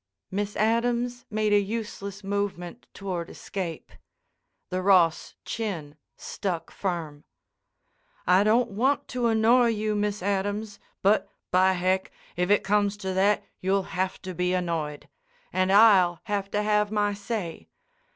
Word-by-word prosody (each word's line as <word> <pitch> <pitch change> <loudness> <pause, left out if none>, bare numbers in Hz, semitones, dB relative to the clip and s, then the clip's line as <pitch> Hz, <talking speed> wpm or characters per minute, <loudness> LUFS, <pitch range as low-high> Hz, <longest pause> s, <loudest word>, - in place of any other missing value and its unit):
Miss 205 +1 -2
Adams 240 +2 0
made 215 -1 +1
a 205 - +6
useless 200 -1 -5
movement 200 +1 -3
toward 180 -4 -5
escape. 175 -5 -6 0.8
The 185 0 -1
Ross 180 -4 +3
chin 175 -10 -4 0.2
stuck 170 -5 -4
firm. 165 -6 -4 1.0
"I 180 +2 +5
don't 225 +2 +3
want 260 +8 +1
to 245 -2 0
annoy 230 +2 +4
you, 215 -1 0
Miss 205 -2 -1
Adams, 205 +1 -2 0.2
but, 205 +3 +3 0.2
by 185 +1 +4
heck, 185 +1 0 0.3
if 180 +1 0
it 205 - +4
comes 205 0 +1
to 190 -2 -3
that 200 +2 +2 0.2
you'll 190 +1 0
have 185 +1 -1
to 185 - -5
be 180 +1 0
annoyed. 165 -5 -3 0.5
And 185 0 +2
I'll 195 -5 +6
have 200 -1 -2
to 210 +1 -1
have 210 0 +2
my 205 -1 +1
say. 200 -4 -5
200 Hz, 135 wpm, -26 LUFS, 185-215 Hz, 1.0 s, a